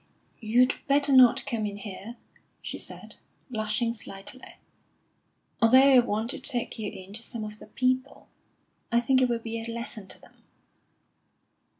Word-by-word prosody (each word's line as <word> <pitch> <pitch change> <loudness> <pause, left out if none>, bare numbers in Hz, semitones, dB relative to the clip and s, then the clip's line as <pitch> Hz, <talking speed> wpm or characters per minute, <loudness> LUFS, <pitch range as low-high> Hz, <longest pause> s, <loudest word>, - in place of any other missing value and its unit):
"You'd 245 +3 +3
better 280 0 +3
not 255 0 +6
come 225 -4 -2
in 200 0 -6
here," 205 +3 -8 0.5
she - - -5
said, - - -8 0.3
blushing 225 +1 -1
slightly; 215 +3 -8 1.2
"although 230 +3 +7 0.2
I 255 - +8
want 230 0 -1
to - - -6
take 245 -5 -1
you 210 -2 -3
in 190 +1 -11
to 225 - -7
some 230 -1 -7
of 210 0 -8
the - - -11
people. 255 +4 -1 0.6
I 235 - +4
think 260 +2 +2
it 255 - +3
will 235 - +1
be 230 0 -5
a 230 - -7
lesson 230 -3 -7
to - - -9
them." - - -21
230 Hz, 160 wpm, -27 LUFS, 215-255 Hz, 1.2 s, I